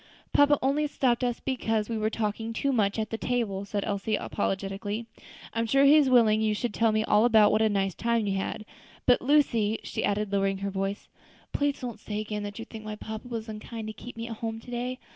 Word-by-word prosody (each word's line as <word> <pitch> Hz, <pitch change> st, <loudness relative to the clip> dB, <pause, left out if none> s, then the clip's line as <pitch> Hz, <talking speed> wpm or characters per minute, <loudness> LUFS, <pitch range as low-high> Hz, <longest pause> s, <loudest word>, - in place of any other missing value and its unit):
"Papa 290 Hz, 0 st, +5 dB
only 290 Hz, +3 st, +2 dB
stopped 250 Hz, -4 st, +1 dB
us 245 Hz, -1 st, -1 dB
because 225 Hz, -5 st, -1 dB
we 230 Hz, -, -3 dB
were 215 Hz, 0 st, 0 dB
talking 220 Hz, +1 st, -2 dB
too 275 Hz, +4 st, 0 dB
much 210 Hz, -3 st, +1 dB
at 220 Hz, 0 st, -2 dB
the 225 Hz, -, -3 dB
table," 215 Hz, -6 st, -1 dB
said 200 Hz, 0 st, -2 dB
Elsie, 205 Hz, +1 st, -1 dB
apologetically; 205 Hz, +3 st, -3 dB, 0.5 s
"I'm 230 Hz, 0 st, 0 dB
sure 275 Hz, +4 st, +4 dB
he 285 Hz, +2 st, +8 dB
is 295 Hz, -3 st, +5 dB
willing 220 Hz, -4 st, +5 dB
you 215 Hz, -1 st, +1 dB
should 235 Hz, +1 st, -2 dB
tell 225 Hz, -1 st, +3 dB
me 215 Hz, 0 st, +1 dB
all 210 Hz, 0 st, +4 dB
about 220 Hz, -3 st, +6 dB
what 215 Hz, -, +2 dB
a 220 Hz, -, +4 dB
nice 195 Hz, -2 st, 0 dB
time 230 Hz, +1 st, 0 dB
you 200 Hz, -, 0 dB
all -, -, -1 dB
had. 215 Hz, -, -5 dB, 0.4 s
But, 245 Hz, -, +5 dB
Lucy," 235 Hz, -6 st, +3 dB
she -, -, -3 dB
added, 205 Hz, 0 st, 0 dB
lowering 195 Hz, -1 st, +1 dB
her 200 Hz, -, -2 dB
voice, 195 Hz, +1 st, -3 dB, 0.5 s
"please 285 Hz, -1 st, 0 dB
don't 240 Hz, -4 st, -5 dB
say 210 Hz, 0 st, -4 dB
again 210 Hz, 0 st, -3 dB
that 205 Hz, 0 st, -6 dB
you 225 Hz, -, -6 dB
think 220 Hz, -2 st, -10 dB, 0.2 s
papa 220 Hz, +2 st, -7 dB
was 230 Hz, -2 st, -5 dB
unkind 220 Hz, +1 st, -7 dB
to -, -, -6 dB
keep 240 Hz, +2 st, -10 dB
me 230 Hz, 0 st, -4 dB
at 225 Hz, -2 st, -6 dB
home 225 Hz, 0 st, -4 dB
to 245 Hz, -, -12 dB
day. 250 Hz, +1 st, -3 dB
220 Hz, 230 wpm, -28 LUFS, 210-240 Hz, 0.5 s, he